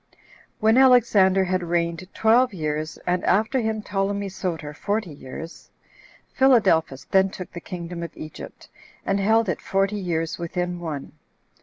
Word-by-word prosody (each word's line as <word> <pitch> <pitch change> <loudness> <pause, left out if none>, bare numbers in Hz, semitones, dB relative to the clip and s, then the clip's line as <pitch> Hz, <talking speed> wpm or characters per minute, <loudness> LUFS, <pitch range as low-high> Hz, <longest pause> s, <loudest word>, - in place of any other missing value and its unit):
1. 220 +1 +4
When 265 - +7
Alexander 210 -7 +5
had 185 0 0
reigned 170 +1 -2
twelve 235 0 +3
years, 155 -1 -3
and 180 0 0
after 220 +5 +2
him 220 -2 -2
Ptolemy 200 0 -2
Soter 165 -5 -4
forty 205 +3 -2
years, 145 +5 -10 0.6
Philadelphus 190 - +3
then 190 0 +4
took 185 -2 -8
the 175 - -8
kingdom 175 -2 -7
of 170 -2 -7
Egypt, 155 -1 -10 0.4
and 195 +1 +1
held 220 +3 +3
it 175 - -2
forty 195 +2 0
years 165 -3 -2
within 175 +1 -3
one. 155 -5 -5
185 Hz, 145 wpm, -24 LUFS, 170-210 Hz, 0.6 s, When